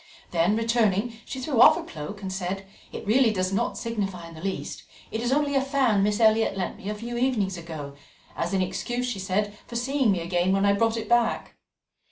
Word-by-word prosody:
Then 175 +4 +2
returning, 230 -1 +1
she 265 - -6
threw 260 -3 +1
off - - +9
her - - -4
cloak 170 +6 -8
and 190 -1 -3
said: 190 +1 -3 0.3
"It - - -7
really 230 +2 +4
does 185 -2 -1
not 235 +4 0
signify 195 -7 -3
in 165 - -12
the 160 - -10
least; 190 +1 -4 0.3
it 220 - -2
is 240 +1 0
only 285 +1 +2
a 270 - +3
fan 265 -7 +2
Miss 205 +1 +1
Elliot 220 -2 +4
lent 185 -2 -3
me 195 - -6
a 210 - -2
few 235 +3 -5
evenings 220 -7 +1
ago 160 -4 -7 0.4
as 170 - -2
an 190 -1 +2
excuse, 240 +6 -2
she 235 -5 -3
said, 205 +2 -1
for 235 - -9
seeing 260 -1 +2
me 180 -3 0
again 175 +2 +1
when 195 +1 +2
I 200 - +5
brought 225 +2 +1
it 220 -1 -4
back." 240 0 +1
210 Hz, 220 wpm, -26 LUFS, 190-235 Hz, 0.4 s, off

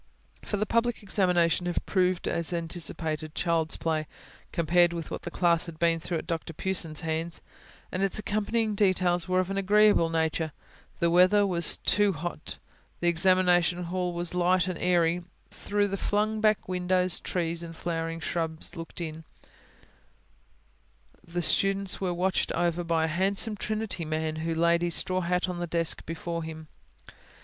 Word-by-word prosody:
For 205 - -3
the 210 - 0
public 230 +1 0
examination 180 -3 +2
had 175 - -2
proved 185 -2 +1
as 170 0 -1
anticipated, 160 -2 -3
child's 165 -2 0
play, 155 -2 -1 0.4
compared 175 +1 +3
with 165 -2 -6
what - - -4
the - - -6
class 170 -1 +1
had 165 -2 -8
been 165 0 +2
through 170 +1 -3
at - - -6
Dr 165 0 -4
Pughson's 165 -3 0
hands; 165 +1 -3 0.5
and 185 - -2
its 195 +1 0
accompanying 215 +2 -1
details 185 -4 +2
were 185 0 +2
of 185 +1 -1
an 195 - -2
agreeable 205 -3 +4
nature: 160 -1 -1 0.5
the 170 0 +2
weather 185 +4 +5
was 170 -4 +5
not - - -34
too 205 -1 +3
hot; 165 0 -5 0.4
the 175 - +2
examination 180 0 +3
hall 180 +1 -2
was 175 0 -2
light 180 0 +2
and 180 -2 -4
airy; 175 -1 +2 0.3
through 205 0 -1
the 195 0 -3
flung 215 +2 0
back 215 -1 +2
windows 180 0 +1
trees 170 -2 -2
and 165 -1 -8
flowering 165 -1 -3
shrubs 160 -1 -3
looked 165 +1 -8
in; 160 -1 -5 2.0
the 175 0 -4
students 195 +2 +1
were 185 -2 0
watched 180 +2 0
over 175 0 0
by 165 -1 +1
a - - +1
handsome 200 +3 +2
Trinity 215 -3 -3
man, 155 0 -2
who 165 +1 -2
laid 170 +1 +3
his 175 -1 +1
straw 185 0 +1
hat 180 +1 0
on 180 -1 -4
the 175 - -3
desk 165 -1 0
before 165 +1 -4
him. 160 -1 -8
175 Hz, 165 wpm, -28 LUFS, 165-185 Hz, 2.0 s, weather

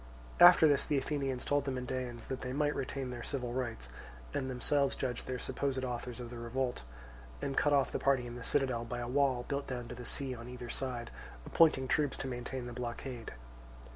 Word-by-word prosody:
After 175 -2 +10
this 145 -2 +3
the 150 - +2
Athenians 135 -2 -1
told 145 -1 +2
the - - -1
Mendaeans 125 -2 -4
that 130 - -4
they 125 0 -3
might 145 +1 +2
retain 135 -1 -3
their 120 -1 -5
civil 125 -2 -3
rights, 120 - -3 0.5
and 130 -2 -1
themselves 140 +2 +1
judge 125 -3 -3
the 130 - -3
supposed 130 +1 -1
authors 125 0 -4
of 120 -1 -6
the 120 - -6
revolt; 125 +2 -2 0.6
and 135 - -2
cut 145 - +3
off 140 -2 +3
the - - -1
party 135 -3 +2
in 120 - -6
the 120 0 -7
citadel 130 -3 +1
by 120 +1 -4
a 120 0 -3
wall 130 -1 +2
built 140 -1 -2
down 125 -2 -4
to - - -5
the 125 - -8
sea 135 +2 0
on 120 0 -8
either 125 -1 -7
side, 125 -3 -3 0.3
appointing 150 -5 +4
troops 145 +1 +1
to - - -4
maintain 125 0 -4
the 120 - -6
blockade. 120 - -5
130 Hz, 205 wpm, -33 LUFS, 120-140 Hz, 0.6 s, After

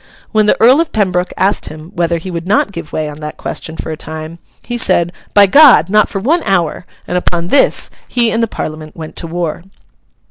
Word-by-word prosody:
When 215 -1 +2
the - - +2
Earl 255 +7 +6
of 335 - -3
Pembroke 185 -4 0
asked 195 +2 +1
him 155 +2 -10
whether 170 0 0
he 180 +3 -7
would 170 0 -5
not 200 0 +2
give 165 -5 -8
way 155 -1 -2
on 150 0 -8
that 150 0 -7
question 160 0 -6
for - - -5
a - - -3
time, 160 +2 -8 0.2
he 240 - -5
said, 175 -8 +1 0.2
'By 205 -1 +8
God! 250 - +6
not 210 0 +4
for - - -4
one 310 - +1
hour!' 180 -3 -1 0.2
and 180 - -1
upon 175 -1 -2
this 280 - +2 0.2
he 235 -2 +1
and 225 - 0
the 230 - +1
Parliament 155 -6 -6
went 160 -1 -9
to 165 - -3
war. 170 -1 -3
175 Hz, 215 wpm, -14 LUFS, 160-215 Hz, 0.2 s, By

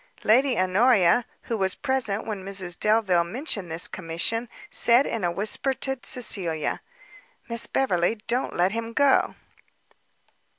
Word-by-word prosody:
Lady 250 +3 +3
Honoria, 195 +2 +4 0.2
who 230 - -3
was 190 -3 -1
present 240 -7 -2
when 210 -4 -5
Mrs 190 -2 -1
Delvile 210 -5 +3
mentioned 200 - -3
this 165 +2 +1
commission, 185 +7 -2 0.2
said 240 +4 +4
in 225 -4 -3
a 175 - +2
whisper 210 +9 0
to 270 0 -2
Cecilia, 180 -10 -2 0.7
"Miss 235 -1 -2
Beverley, 185 -6 +1
don't 245 +3 -1
let 180 +2 +2
him 230 +1 -4
go." 280 +1 +3
215 Hz, 130 wpm, -25 LUFS, 185-240 Hz, 0.7 s, Honoria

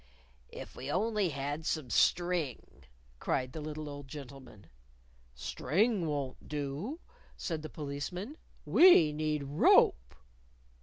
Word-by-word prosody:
"If - - -10
we 130 +2 -7
only 210 +1 +1
had 145 +2 -4
some 155 -6 -2
string!" 160 - 0 0.3
cried 130 0 -1
the 155 - -5
little 155 0 -6
old 145 -1 -8
gentleman. 130 -6 -11 0.7
"String 185 - 0
won't 140 -4 -4
do," 150 - -4 0.4
said 160 -3 -3
the 155 - -7
Policeman. 155 - -5 0.3
"We 180 - +7
need 150 -1 -1
rope." 65 - +4
150 Hz, 110 wpm, -32 LUFS, 140-175 Hz, 0.7 s, We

